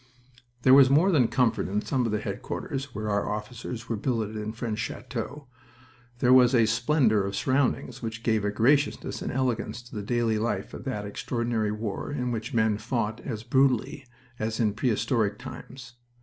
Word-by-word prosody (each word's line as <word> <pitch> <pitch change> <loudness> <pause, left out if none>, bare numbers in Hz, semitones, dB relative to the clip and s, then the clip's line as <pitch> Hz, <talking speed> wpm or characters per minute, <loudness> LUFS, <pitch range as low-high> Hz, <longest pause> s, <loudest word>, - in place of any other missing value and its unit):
There 130 - +7
was 135 -1 +8
more 160 +8 +4
than 135 -9 +4
comfort 125 -2 +1
in 105 +3 -1
some 125 -3 0
of - - -2
the 105 - 0
headquarters 135 0 -4
where 105 +1 -3
our 100 0 0
officers 115 +2 -5
were 115 - -1
billeted 110 -1 -2
in 105 0 -3
French 110 -1 -4
chateaux. 130 +5 -5 0.7
There 125 +1 +4
was 130 0 +6
a 115 -2 +5
splendor 115 -1 +2
of 100 0 -3
surroundings 130 0 0
which 110 -1 -5
gave 110 -3 +1
a 105 - +1
graciousness 135 +8 +1
and - - -3
elegance 125 -2 -1
to 120 - -16
the 105 - -3
daily 115 0 0
life 105 -3 -2
of - - -8
that 105 -6 -3
extraordinary 115 +1 -2
war 105 +4 -4
in 125 -4 -2
which 115 +3 -4
men 110 -4 +2
fought 115 -3 -2
as 110 -5 -5
brutally 130 +1 +1 0.3
as 110 0 -2
in 110 -3 +2
prehistoric 110 -2 0
times. 125 +1 -10
115 Hz, 175 wpm, -27 LUFS, 110-130 Hz, 0.7 s, was